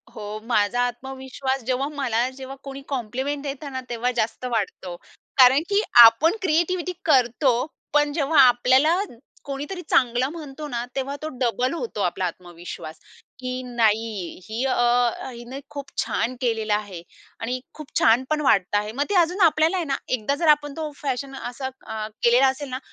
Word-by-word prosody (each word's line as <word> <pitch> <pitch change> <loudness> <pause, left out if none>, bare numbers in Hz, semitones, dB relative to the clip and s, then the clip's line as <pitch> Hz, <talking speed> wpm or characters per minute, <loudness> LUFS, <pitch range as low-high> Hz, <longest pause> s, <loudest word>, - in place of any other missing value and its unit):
हो, 210 0 -6
माझा 230 +1 +2
आत्मविश्वास, 265 +1 -4
जेव्हा 260 +2 0
मला 245 -2 0
जेव्हा 265 0 -8
कोणी 275 0 -7
कॉम्प्लिमेंट 270 +3 -3
देतं 280 0 -5
ना, 260 0 -4
तेव्हा 240 +1 -1
जास्त 225 +3 -4
वाढतो 190 -5 -3 0.4
कारण, 260 +2 +7
की 405 +1 +3 0.2
आपण 280 - +6
क्रिएटिव्हिटी 360 +1 0
करतो, 255 -2 +3 0.4
पण 295 -1 +3
जेव्हा 300 -1 +2
आपल्याला 260 +8 +4 0.5
कोणीतरी 290 +7 -5
चांगलं 250 +1 +2
म्हणतो 300 -2 -8
ना, 240 -2 -3
तेव्हा 275 +1 -2
तो 310 - -3
डबल 250 +3 +1
होतो 335 - -4
आपला 180 0 0
आत्मविश्वास, 175 -2 -7 0.4
की 255 0 -4
नाही 220 -6 0
ही 225 +4 -3
अ, 240 -2 +3 0.2
हिने 240 +3 -8
खूप 280 -1 -7
छान 245 +3 -1
केलेला 220 -3 +1
आहे 200 -5 -5 0.4
आणि 250 +3 -3
खूप 305 -2 -10
छान 230 +3 +4
पण 305 0 +1
वाटतं 205 -7 +3
आहे. 210 +1 -2
मग 280 +5 -1
ते 410 - 0
अजून 355 +3 +3
आपल्याला 320 +3 +3
आहे 340 - -1
ना, 275 -1 -1
एकदा 255 +3 0
जर 325 +2 -1
आपण 290 -1 +4
तो 310 -2 -3
फॅशन 270 -1 -4
असा 260 +1 -5 0.2
अ, 215 -1 -4 0.2
केलेला 245 +3 +5
असेल 265 +1 -2
ना, 255 +1 -4
260 Hz, 160 wpm, -23 LUFS, 230-285 Hz, 0.5 s, कारण